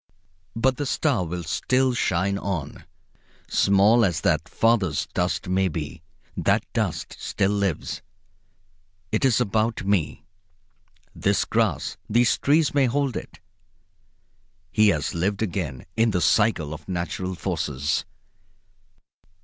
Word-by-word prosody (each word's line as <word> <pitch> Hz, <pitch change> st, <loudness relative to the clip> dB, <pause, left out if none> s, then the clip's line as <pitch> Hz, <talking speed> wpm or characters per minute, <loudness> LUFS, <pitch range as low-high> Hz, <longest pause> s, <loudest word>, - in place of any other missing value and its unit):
But 130 Hz, +3 st, +1 dB
the 145 Hz, -, -2 dB
star 130 Hz, -, +1 dB
will 90 Hz, +1 st, -4 dB
still 125 Hz, +10 st, +1 dB
shine 100 Hz, -3 st, 0 dB
on. 85 Hz, -9 st, -4 dB, 0.6 s
Small 100 Hz, +4 st, +4 dB
as 85 Hz, -5 st, +1 dB
that 80 Hz, +2 st, +1 dB
father's 105 Hz, -10 st, +1 dB
dust 90 Hz, +1 st, -1 dB
may 95 Hz, +1 st, +2 dB
be, 80 Hz, -1 st, -5 dB, 0.3 s
that -, -, +2 dB
dust -, -, -2 dB
still 95 Hz, 0 st, 0 dB
lives. 100 Hz, -5 st, -2 dB, 1.1 s
It 110 Hz, -, 0 dB
is 130 Hz, -4 st, +4 dB
about 110 Hz, 0 st, 0 dB
me. 95 Hz, -6 st, 0 dB, 0.9 s
This -, -, +1 dB
grass, -, -, 0 dB
these 120 Hz, +2 st, +3 dB
trees, 150 Hz, +1 st, +3 dB
may 140 Hz, -2 st, +3 dB
hold 135 Hz, 0 st, 0 dB
it. -, -, -7 dB, 1.3 s
He 110 Hz, +2 st, +4 dB
has 80 Hz, -6 st, +1 dB
lived 100 Hz, +5 st, -1 dB
again 85 Hz, -, -3 dB
in 115 Hz, +1 st, +3 dB
the 95 Hz, -4 st, 0 dB
cycle 80 Hz, -2 st, +2 dB
of 75 Hz, +4 st, -10 dB
natural 90 Hz, +1 st, -3 dB
forces. 75 Hz, -6 st, -2 dB
95 Hz, 120 wpm, -24 LUFS, 85-115 Hz, 1.3 s, Small